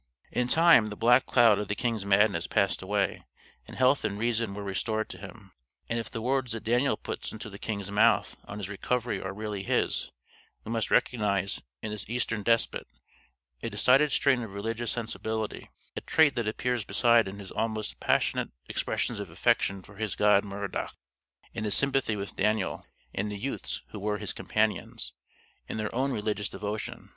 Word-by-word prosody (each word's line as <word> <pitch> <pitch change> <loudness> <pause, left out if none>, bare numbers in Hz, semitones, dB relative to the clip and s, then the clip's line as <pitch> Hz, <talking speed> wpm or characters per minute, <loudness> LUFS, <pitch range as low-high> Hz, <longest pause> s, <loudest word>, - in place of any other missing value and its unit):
"] 65 - -35
In 125 - +1
time, 160 -7 +6
the 105 - -6
black 120 +4 +4
cloud 115 -5 +5
of 105 - -3
the 100 - -1
king's 110 -3 -1
madness 100 -3 +3
passed 100 -3 +1
away 100 +1 -1 0.4
and - - -10
health 130 +2 +4
and 105 -2 -1
reason 115 -2 0
were 105 - -5
restored 110 +3 -1
to - - -9
him. 100 -5 -11 0.4
And 115 - -1
if 115 -1 -5
the 115 -2 -5
words 130 -1 0
that 115 - -5
Daniel 120 +5 +2
puts - - -5
into 110 -1 -8
the 100 - -10
king's 100 -3 -4
mouth 105 - +3
on 100 - -7
his 100 -3 -4
recovery 120 +4 -1
are 95 - -4
really 105 0 -4
his, 95 - 0 0.5
we 110 - -6
must 115 -2 0
recognize 100 -6 +1 0.2
in 105 - -3
this 105 -1 -6
Eastern 115 -2 -1
Despot 115 +2 +1 0.7
a - - -2
decided 130 +7 +4
strain 130 -3 +3
of 110 -4 -6
religious 115 +3 -2
sensibility, 110 -2 -3 0.3
a - - -3
trait 155 -3 +4
that 120 -3 -1
appears 120 +1 -1
beside 115 +3 +4
in 95 +1 -6
his 100 -2 -9
almost 110 -1 -2
passionate - - +1 0.2
expressions - - -1
of - - -5
affection 95 -1 +1
for 100 +1 -15
his 110 0 -2
god 105 -1 +5
Merodach, 100 -1 -4 0.6
and - - -4
in - - -3
his 105 - +2
sympathy 135 -5 +1
with 100 -1 -5
Daniel 105 -3 0 0.3
and 105 +2 -1
the 105 - -4
youths 130 +7 -4
who 105 - -7
were 105 +1 -1
his - - -3
companions, - - -1 0.5
in - - -4
their 110 -1 -3
own 135 +3 +1
religious 105 -3 -1
devotion. 105 +1 -5
110 Hz, 185 wpm, -29 LUFS, 100-120 Hz, 0.7 s, time